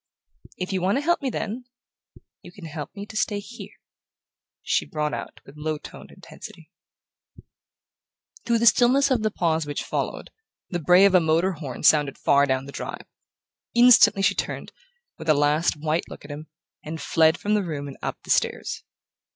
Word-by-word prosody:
"If 185 Hz, +1 st, -4 dB
you 185 Hz, -, -1 dB
want 195 Hz, +7 st, +1 dB
to -, -, 0 dB
help 345 Hz, +2 st, +1 dB
me, 270 Hz, -, -1 dB
then 235 Hz, +1 st, -5 dB, 0.8 s
you -, -, -13 dB
can 180 Hz, -1 st, -12 dB
help 155 Hz, -2 st, -6 dB
me 200 Hz, 0 st, -7 dB
to 220 Hz, -, -13 dB
stay 210 Hz, -1 st, 0 dB
here," 235 Hz, +4 st, -11 dB, 0.9 s
she -, -, +1 dB
brought 150 Hz, -1 st, -3 dB
out -, -, -6 dB
with 135 Hz, -, -15 dB
low 155 Hz, 0 st, -3 dB
toned -, -, -12 dB
intensity. -, -, -13 dB, 1.7 s
Through 235 Hz, 0 st, +1 dB
the 230 Hz, -, 0 dB
stillness 255 Hz, +4 st, +4 dB
of 250 Hz, -4 st, +2 dB
the 215 Hz, -, +1 dB
pause 160 Hz, -6 st, -1 dB
which 145 Hz, -, -3 dB
followed, -, -, -4 dB, 0.4 s
the 175 Hz, -, -1 dB
bray 180 Hz, +4 st, +5 dB
of 200 Hz, -, +4 dB
a 185 Hz, -, +7 dB
motor 165 Hz, +3 st, +1 dB
horn 145 Hz, -8 st, -7 dB
sounded 150 Hz, -3 st, +4 dB
far 140 Hz, 0 st, +3 dB
down 130 Hz, 0 st, -1 dB
the 140 Hz, -, -9 dB
drive. -, -, -7 dB, 0.7 s
Instantly 240 Hz, -5 st, +6 dB
she 195 Hz, -, +4 dB
turned, -, -, -4 dB, 0.5 s
with 160 Hz, -, -6 dB
a 155 Hz, -, +6 dB
last 150 Hz, +4 st, +2 dB
white 155 Hz, +2 st, -2 dB
look -, -, -11 dB
at 145 Hz, -, -9 dB
him, 150 Hz, +2 st, -8 dB, 0.4 s
and 160 Hz, +2 st, -6 dB
fled 160 Hz, +2 st, +3 dB
from 210 Hz, -, -1 dB
the 210 Hz, -, +2 dB
room 150 Hz, -5 st, -5 dB
and 140 Hz, -, -9 dB
up -, -, -4 dB
the -, -, -5 dB
stairs. -, -, 0 dB
170 Hz, 185 wpm, -24 LUFS, 150-210 Hz, 1.7 s, a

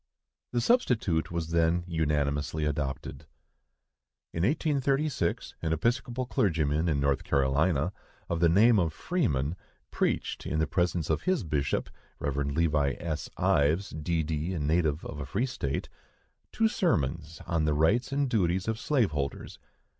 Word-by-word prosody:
The 120 Hz, -, 0 dB
substitute 115 Hz, -, +2 dB
was 85 Hz, -1 st, -3 dB
then 85 Hz, +1 st, +2 dB
unanimously 75 Hz, -2 st, 0 dB
adopted. 70 Hz, 0 st, -3 dB, 1.1 s
In 80 Hz, -, -2 dB
1836, 140 Hz, -, 0 dB
an 80 Hz, -1 st, 0 dB
Episcopal 120 Hz, -, -1 dB
clergyman 80 Hz, -, +1 dB
in 75 Hz, -3 st, +1 dB
North 70 Hz, 0 st, +1 dB
Carolina, 70 Hz, +5 st, +1 dB, 0.3 s
of 85 Hz, -, -1 dB
the 85 Hz, -1 st, +5 dB
name 105 Hz, +5 st, +5 dB
of 85 Hz, -3 st, 0 dB
Freeman, 80 Hz, -, -1 dB, 0.4 s
preached, -, -, -1 dB
in 80 Hz, -, -1 dB
the 80 Hz, -, +2 dB
presence 85 Hz, -2 st, 0 dB
of -, -, 0 dB
his 185 Hz, -, 0 dB
bishop 75 Hz, -4 st, -1 dB, 0.3 s
(Rev. 70 Hz, -1 st, -3 dB
Levi. 70 Hz, -1 st, +1 dB
S. 80 Hz, -3 st, -4 dB
Ives, 90 Hz, 0 st, +2 dB
D.D., 80 Hz, +2 st, -2 dB
a -, -, -2 dB
native 75 Hz, +1 st, +1 dB
of 75 Hz, -, -6 dB
a 70 Hz, -, -4 dB
free 105 Hz, -, 0 dB
state), 70 Hz, -, -3 dB, 0.6 s
two 225 Hz, -, +2 dB
sermons 80 Hz, -, -1 dB
on 80 Hz, -2 st, 0 dB
the 75 Hz, -1 st, +1 dB
rights 100 Hz, -, +2 dB
and 140 Hz, 0 st, +1 dB
duties 95 Hz, -6 st, +1 dB
of 110 Hz, 0 st, -1 dB
slave 125 Hz, -, +1 dB
holders. 70 Hz, -2 st, -4 dB
80 Hz, 140 wpm, -29 LUFS, 75-105 Hz, 1.1 s, the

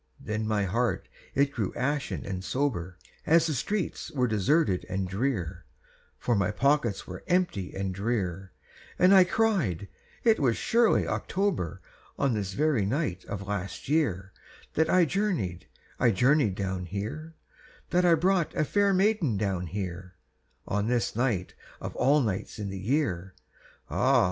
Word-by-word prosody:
Then 110 Hz, 0 st, -3 dB
my 105 Hz, -2 st, +1 dB
heart 115 Hz, +6 st, 0 dB, 0.3 s
it 140 Hz, +1 st, +3 dB
grew 110 Hz, -8 st, -3 dB
ashen 140 Hz, +2 st, -2 dB
and 95 Hz, -1 st, -4 dB
sober, 95 Hz, -10 st, -2 dB, 0.3 s
As 165 Hz, +1 st, +5 dB
the 160 Hz, -, 0 dB
streets 185 Hz, -, -2 dB
were 135 Hz, -6 st, 0 dB
deserted 110 Hz, -, +2 dB
and 95 Hz, 0 st, -1 dB
drear, 95 Hz, -, -2 dB, 0.5 s
For 120 Hz, -, 0 dB
my 100 Hz, -3 st, +1 dB
pockets 130 Hz, -1 st, +1 dB
were 90 Hz, 0 st, -8 dB
empty 175 Hz, -, 0 dB
and 95 Hz, -1 st, -2 dB
drear; 95 Hz, -3 st, -2 dB, 0.5 s
And 185 Hz, +2 st, +6 dB
I 190 Hz, -2 st, +8 dB
cried: 180 Hz, -, 0 dB, 0.4 s
"It 225 Hz, -2 st, +4 dB
was 125 Hz, -5 st, +2 dB
surely 235 Hz, -1 st, +3 dB
October, 185 Hz, -, -1 dB, 0.4 s
On 135 Hz, -3 st, +1 dB
this 100 Hz, -3 st, -2 dB
very 145 Hz, -4 st, +2 dB
night 100 Hz, -, -1 dB
of 100 Hz, -1 st, -5 dB
last 100 Hz, +1 st, -4 dB
year, 100 Hz, -, +1 dB, 0.4 s
That 160 Hz, -, +2 dB
I 180 Hz, -2 st, +5 dB
journeyed, 160 Hz, -, -1 dB, 0.3 s
I 125 Hz, -, +4 dB
journeyed 125 Hz, 0 st, +3 dB
down 95 Hz, -2 st, -3 dB
here, 110 Hz, -, -5 dB, 0.6 s
That 180 Hz, +1 st, +3 dB
I 175 Hz, -2 st, +6 dB
brought 180 Hz, 0 st, +1 dB
a 155 Hz, -, +1 dB
fair 200 Hz, +3 st, +2 dB
maiden 190 Hz, -, +2 dB
down 95 Hz, -3 st, -1 dB
here, 90 Hz, -1 st, -5 dB, 0.5 s
On 105 Hz, +1 st, 0 dB
this 120 Hz, -2 st, 0 dB
night 115 Hz, -7 st, 0 dB, 0.3 s
of -, -, -6 dB
all 145 Hz, +4 st, +4 dB
nights 100 Hz, -6 st, -3 dB
in 105 Hz, -2 st, -4 dB
the 95 Hz, -, -5 dB
year! 95 Hz, -, -1 dB, 0.5 s
Ah! -, -, +3 dB
115 Hz, 150 wpm, -28 LUFS, 95-155 Hz, 0.6 s, I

